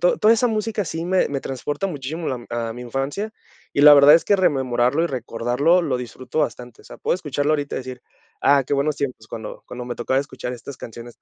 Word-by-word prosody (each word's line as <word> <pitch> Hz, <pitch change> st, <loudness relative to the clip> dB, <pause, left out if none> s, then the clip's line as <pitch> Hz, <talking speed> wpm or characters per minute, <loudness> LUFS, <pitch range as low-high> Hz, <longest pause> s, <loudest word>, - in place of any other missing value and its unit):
to 180 Hz, -, +3 dB
toda 220 Hz, +2 st, +5 dB
esa 245 Hz, +2 st, +2 dB
música 215 Hz, -1 st, -1 dB
sí 165 Hz, +1 st, -4 dB
me 185 Hz, +1 st, +2 dB
me 140 Hz, -1 st, -3 dB
transporta 145 Hz, +8 st, -3 dB
muchísimo, 155 Hz, 0 st, -5 dB
lam 125 Hz, -3 st, -4 dB
a 115 Hz, -1 st, -2 dB
mi 125 Hz, +2 st, -8 dB
infancia, 135 Hz, -, -3 dB, 0.4 s
y -, -, +1 dB
la 145 Hz, 0 st, +10 dB
verdad 145 Hz, +1 st, +8 dB
es 165 Hz, -, +4 dB
que 205 Hz, -, +3 dB
rememorarlo 130 Hz, -4 st, +2 dB
y -, -, +2 dB
recordarlo 125 Hz, +5 st, +1 dB
lo 130 Hz, -6 st, 0 dB
disfruto 125 Hz, +4 st, -4 dB
bastante, 125 Hz, -4 st, -4 dB
o -, -, -27 dB
sea, -, -, -11 dB
puedo -, -, 0 dB
escucharlo 150 Hz, -3 st, -1 dB
ahorita 145 Hz, -2 st, -2 dB
y -, -, 0 dB
decir: 130 Hz, -1 st, -8 dB, 0.4 s
"Ah, 140 Hz, -1 st, +4 dB
qué 145 Hz, -, 0 dB
buenos 145 Hz, +1 st, 0 dB
tiempos, 130 Hz, -5 st, -4 dB
cuando 110 Hz, -1 st, -7 dB
cuando 125 Hz, 0 st, -7 dB
me 120 Hz, -, -5 dB
tocaba 130 Hz, +3 st, 0 dB
escuchar 130 Hz, -3 st, -6 dB
estas 125 Hz, +2 st, -9 dB
canciones". 120 Hz, 0 st, -10 dB
140 Hz, 225 wpm, -22 LUFS, 125-160 Hz, 0.4 s, la